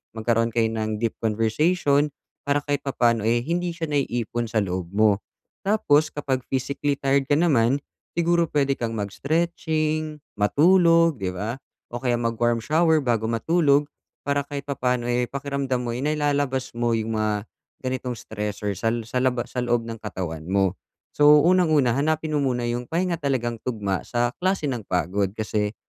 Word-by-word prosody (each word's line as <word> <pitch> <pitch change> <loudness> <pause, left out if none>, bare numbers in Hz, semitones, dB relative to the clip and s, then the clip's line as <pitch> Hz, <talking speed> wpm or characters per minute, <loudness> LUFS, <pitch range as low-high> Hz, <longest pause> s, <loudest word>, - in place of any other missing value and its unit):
Magkaroon 115 +1 +1
kayo 115 -1 +2
ng 110 -1 -2
deep 115 -1 0
conversation 140 - +2 0.4
para 145 0 +2
kahit 145 -1 -1
papaano 120 -4 +2
eh, 120 +1 +2
hindi 175 +2 -1
siya 165 -2 -4
naiipon 120 -4 -1
sa 110 -1 +1
loob 90 -2 -3
mo. 105 -2 +3 0.4
Tapos 155 -8 +3
kapag 135 -3 -1
physically 140 +2 -1
tired 135 0 +1
ka 145 - +4
naman, 140 -5 +3 0.4
siguro 170 0 +2
pwede 140 -2 +2
kang 115 -1 -2
mag-stretching, 155 - -1 0.2
matulog, 165 - +4
di 95 - -1
ba? 110 +7 -4 0.3
O 120 - -4
kaya 125 -2 +1
mag-warm 115 0 +1
shower 160 +4 +3
bago 115 -3 0
matulog, 145 +4 +2 0.4
para 140 0 +1
kahit 140 -1 -5
papaano 125 -3 -1
eh, 125 0 +1
pakiramdam 140 -2 -2
mo 120 - -2
eh, 120 - -4
nailalabas 145 -3 0
mo 120 0 +1
yung 110 0 -2
mga 105 -1 -1 0.4
ganitong 130 -1 -3
stress 105 -2 -5
or 105 - 0
sal 115 +3 0
sa - - -2
laba 125 -1 +1
sa - - -10
loob 120 -1 +1
ng 115 - -5
katawan 85 -6 -5
mo. 95 -1 +1 0.3
So, 150 0 +6
unang 175 -2 +4
una, 130 -5 +4
hanapin 155 +2 0
mo - - +1
muna 125 -3 0
yung 120 +1 -2
pahinga 170 0 -1
talagang 120 -5 -1
tugma 105 -6 -2
sa 120 0 0
klase 190 -1 0
ng 120 -6 -4
pagod, 90 +3 0
kasi 105 -1 -2
125 Hz, 165 wpm, -24 LUFS, 115-150 Hz, 0.4 s, So